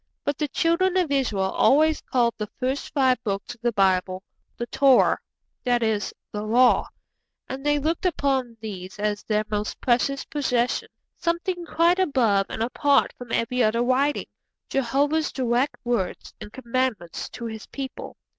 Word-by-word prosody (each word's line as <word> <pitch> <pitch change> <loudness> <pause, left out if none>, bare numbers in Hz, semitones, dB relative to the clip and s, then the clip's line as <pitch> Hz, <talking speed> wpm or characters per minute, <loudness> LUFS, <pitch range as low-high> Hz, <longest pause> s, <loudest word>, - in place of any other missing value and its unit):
But 285 -1 -2
the 300 - 0
Children 350 +6 +1
of 350 -6 +1
Israel 210 -9 +1
always 310 +2 +3
called 240 -2 +1
the 210 -1 -5
first 265 +2 -2
five 260 -4 +2
books 200 -1 -3
of 240 - -20
the 240 0 +1
Bible 190 -2 +1 0.3
'The 240 - -3
Torah'; 265 +1 +4 0.4
that 245 -2 +2
is, 215 -3 0 0.2
'The 210 - -4
Law'; 240 +4 +4 0.6
and 265 +1 -6
they 295 0 +2
looked 320 +5 0
upon 265 -8 -1
these 190 -4 -7
as 210 0 -1
their 215 -1 0
most 210 0 -2
precious 265 +3 +1
possession, 250 -4 0 0.3
something 345 +1 -2
quite 340 +3 +3
above 235 - +2
and 220 - -2
apart 280 +4 +2
from 245 -2 -10
every 250 +2 0
other 230 +1 +2
writing 270 +4 +1 0.4
Jehovah's 285 +4 +1
direct 255 +1 0
words 235 -7 -2
and 210 - -8
commandments 240 -8 -2
to 235 - -8
His 220 -1 -7
people. 270 -2 -7
250 Hz, 155 wpm, -24 LUFS, 220-285 Hz, 0.6 s, Torah